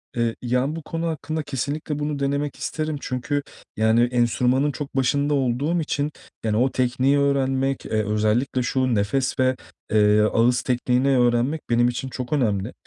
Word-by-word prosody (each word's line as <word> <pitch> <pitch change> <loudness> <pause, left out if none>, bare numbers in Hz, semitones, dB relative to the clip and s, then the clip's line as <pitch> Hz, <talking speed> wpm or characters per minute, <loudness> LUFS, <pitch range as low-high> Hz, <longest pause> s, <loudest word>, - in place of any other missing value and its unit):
Eee, 115 -1 0
yani, 125 +4 0
bu 165 - -5
konu 165 +2 -3
hakkında 155 -1 -3
kesinlikle 145 +2 -3
bunu 145 -1 -2
denemek 140 +1 -1
isterim 155 -1 -3
çünkü, 130 +3 -2 0.4
yani, 110 +2 +3
enstrümanın 125 +3 +2
çok 145 -1 -7
başında 140 +3 +1
olduğum 140 +5 0
için, 150 -1 -2 0.3
yani, 110 -1 0
o 130 +3 +2
tekniği 130 +2 +1
öğrenmek, 135 -1 0
eee, - - -8
özellikle 110 +5 0
şu 130 0 0
nefes 130 +7 0
ve, 130 0 +3 0.4
eee, 105 0 +4
ağız 115 +3 +3
tekniğini 125 +2 +1
öğrenmek 120 +5 +2
benim 120 0 +3
için 125 +2 -4
çok 125 +1 -5
önemli. 110 -6 0
130 Hz, 155 wpm, -23 LUFS, 120-145 Hz, 0.4 s, eee